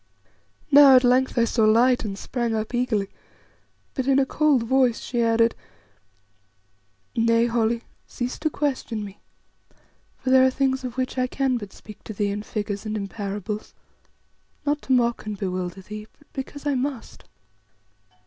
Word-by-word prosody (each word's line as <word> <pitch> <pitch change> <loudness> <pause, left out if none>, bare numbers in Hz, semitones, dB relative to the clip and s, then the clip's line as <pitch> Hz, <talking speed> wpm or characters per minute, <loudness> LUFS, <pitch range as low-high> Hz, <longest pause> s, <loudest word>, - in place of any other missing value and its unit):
Now 280 -2 +9
at 255 - +6
length 255 +1 +2
I 235 - +5
saw 230 0 +1
light 235 +4 +4
and 200 -3 -4
sprang 235 0 -2
up 220 +2 -3
eagerly, 225 -5 0 0.8
but 260 -1 -3
in 270 -1 +4
a 275 - +4
cold 290 -3 +2
voice 250 0 +2
she 240 -1 -2
added: 230 0 +3 1.6
"Nay, 230 0 +3
Holly, 230 0 0 0.2
cease 245 +1 -4
to 310 - 0
question 260 -8 -2
me, 200 0 -11 1.0
for 260 - -2
there 260 0 +7
are 260 - +5
things 265 0 0
of 250 -1 -6
which 255 0 -2
I 255 - +1
can 265 -1 0
but 205 -4 -8
speak 215 -1 -14
to 220 - -6
thee 205 0 -1
in 205 +1 -3
figures 205 -1 -4
and 215 0 -3
in 200 -1 -4
parables, 205 0 -5 0.9
not 290 +1 0
to - - -6
mock 235 -3 +2
and 210 -1 -4
bewilder 185 -1 -4
thee, 210 +2 -8
but 290 - -25
because 285 +1 -7
I 290 - +1
must. 260 -1 -4
235 Hz, 165 wpm, -24 LUFS, 215-260 Hz, 1.6 s, Now